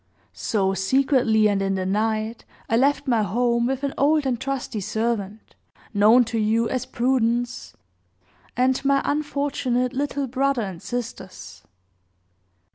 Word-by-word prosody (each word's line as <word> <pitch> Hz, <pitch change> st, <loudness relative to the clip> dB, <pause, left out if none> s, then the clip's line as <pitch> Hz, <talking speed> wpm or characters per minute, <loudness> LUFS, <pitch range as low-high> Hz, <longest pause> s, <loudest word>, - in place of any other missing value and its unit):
So, 195 Hz, -3 st, 0 dB
secretly, 225 Hz, -, +2 dB
and 200 Hz, -1 st, 0 dB
in 195 Hz, 0 st, 0 dB
the 185 Hz, -1 st, -2 dB
night, 215 Hz, +3 st, -1 dB, 0.2 s
I 225 Hz, -, +1 dB
left 275 Hz, +4 st, +2 dB
my 235 Hz, -4 st, +2 dB
home, 235 Hz, +4 st, +1 dB
with 270 Hz, +1 st, -2 dB
an 280 Hz, -, -1 dB
old 295 Hz, +1 st, +3 dB
and 245 Hz, -3 st, -1 dB
trusty 265 Hz, -4 st, -3 dB
servant, 220 Hz, 0 st, -3 dB, 0.4 s
known 220 Hz, +4 st, +6 dB
to 225 Hz, 0 st, -2 dB
you 225 Hz, +2 st, +1 dB
as 255 Hz, 0 st, -3 dB
Prudence, 245 Hz, -1 st, -1 dB, 0.8 s
and 255 Hz, +1 st, +2 dB
my 275 Hz, 0 st, +2 dB
unfortunate, 280 Hz, -4 st, -1 dB
little 285 Hz, +1 st, -2 dB
brother 265 Hz, -1 st, 0 dB
and 185 Hz, -4 st, -7 dB
sisters. 230 Hz, -6 st, -7 dB
240 Hz, 130 wpm, -23 LUFS, 215-265 Hz, 0.8 s, known